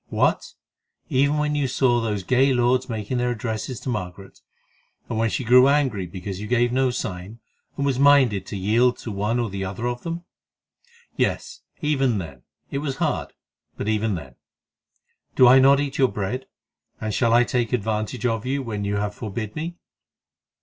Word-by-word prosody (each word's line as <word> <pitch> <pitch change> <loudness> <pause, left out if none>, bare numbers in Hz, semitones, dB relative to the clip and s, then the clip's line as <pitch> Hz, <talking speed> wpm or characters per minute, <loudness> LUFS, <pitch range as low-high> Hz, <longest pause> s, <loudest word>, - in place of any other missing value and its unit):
"What! - - 0 0.6
Even 140 +3 +2
when 150 0 0
you 145 -2 0
saw 125 -2 +2
those 105 -4 -2
gay 130 +6 +3
lords 125 +2 +2
making 110 +2 -3
their 125 0 +1
addresses 115 +1 -4
to - - -5
Margaret, 95 -4 -6 0.7
and 110 - -3
when 115 0 +2
she 130 - -2
grew 125 +2 +6
angry 130 -10 +1
because 95 +2 -6
you 105 - -5
gave 120 0 +2
no 130 +1 +2
sign, 95 -3 -5 0.4
and 140 - -1
was 135 -2 0
minded 135 -9 +4
to 100 - -5
yield 115 +6 +2
to 115 - -7
one 105 +4 -1
or 115 -4 -2
the 95 0 -4
other 95 +5 -4
of 120 0 -2
them?" 170 +1 -5 0.9
"Yes, - - -1 0.2
even 135 -6 +1
then—it 80 - -8
was 140 -2 -3
hard, - - -2 0.4
but - - -4
even 110 -1 0
then. 70 -7 -9 1.0
Do 130 - +7
I 130 +2 +8
not 135 +1 +6
eat 140 -1 -3
your 130 - +5
bread? 110 +6 -3 0.5
and 110 -1 -3
shall 115 +1 +2
I 120 +1 +6
take 120 -2 -1
advantage 110 +1 -2
of 115 -3 0
you 135 +2 -2
when 105 -4 -4
you 100 0 -1
have 105 0 -1
forbid 110 -1 -5
me?" 165 +3 -4
120 Hz, 175 wpm, -23 LUFS, 105-130 Hz, 1.0 s, I